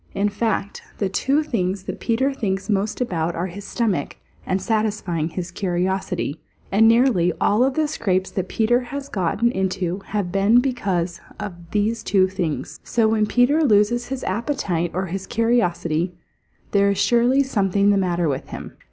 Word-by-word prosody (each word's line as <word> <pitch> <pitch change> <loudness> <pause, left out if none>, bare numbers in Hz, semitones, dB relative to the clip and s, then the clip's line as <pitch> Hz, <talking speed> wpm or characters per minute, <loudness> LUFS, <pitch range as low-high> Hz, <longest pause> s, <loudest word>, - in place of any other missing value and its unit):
In 205 +1 +1
fact, 205 -1 -2 0.2
the 195 - 0
two 275 +10 +1
things 190 -8 -2
that - - -6
Peter 260 +4 +1
thinks 200 -4 -2
most 205 +4 -1
about 170 -8 -1
are 170 - -2
his 190 +2 -8
stomach 205 - -1 0.3
and 185 - +1
satisfying 200 -6 -1
his 175 +1 -5
curiosity, 180 -3 -2 0.3
and 215 +3 +5
nearly 225 -7 +4
all 215 +4 +3
of 265 0 +1
the 310 -1 +2
scrapes 190 -10 -1
that 190 -1 -2
Peter 230 +2 +2
has 275 +3 -6
gotten 205 +5 +1
into 185 -2 -1
have 200 -4 -2
been 200 +5 +4
because 190 -10 -1 0.2
of 210 -3 -4 0.2
those 215 +3 0
two 190 -2 +3
things. 180 -5 -4
So 230 -2 +2
when 215 -1 +2
Peter 260 +8 +3
loses 240 0 +3
his 265 -1 -4
appetite 185 - -1
or 185 +1 0
his 190 +2 -5
curiosity, 180 -7 0 0.6
there 200 0 +4
is 200 - 0
surely 245 +3 +3
something 200 -5 +2
the - - +3
matter 175 -3 0
with 135 -2 -3
him. - - -8
200 Hz, 165 wpm, -22 LUFS, 185-235 Hz, 0.6 s, and